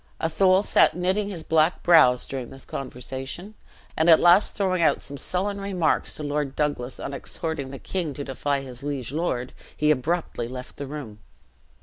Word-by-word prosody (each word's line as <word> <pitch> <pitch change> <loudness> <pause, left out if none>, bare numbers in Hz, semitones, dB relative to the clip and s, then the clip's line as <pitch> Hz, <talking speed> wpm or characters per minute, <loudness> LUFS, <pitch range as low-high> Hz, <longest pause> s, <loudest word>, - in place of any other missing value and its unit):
Athol 185 +4 +3
sat - - +4
knitting 190 +3 0
his 175 -5 -6
black 160 +2 +2
brows 155 -8 +6
during 130 -3 -5
this 135 - -10
conversation; 135 - -6 0.4
and 160 +2 +3
at 160 - +8
last 175 +4 +5
throwing 185 -3 0
out 160 - +3
some 140 - -8
sullen 195 +7 -2
remarks 185 -5 0
to 155 - -5
Lord 145 -2 -2
Douglas 145 -4 -2
on 140 - -5
exhorting 145 0 -4
the 135 - -7
king 165 -2 -4
to 145 - -4
defy 140 +1 -2
his 130 -2 -9
liege 140 -4 -4
lord, 135 -6 -2 0.2
he 150 0 +3
abruptly 150 -3 -1
left 125 +1 -8
the 140 - -5
room. 135 -8 -8
150 Hz, 170 wpm, -25 LUFS, 135-175 Hz, 0.4 s, at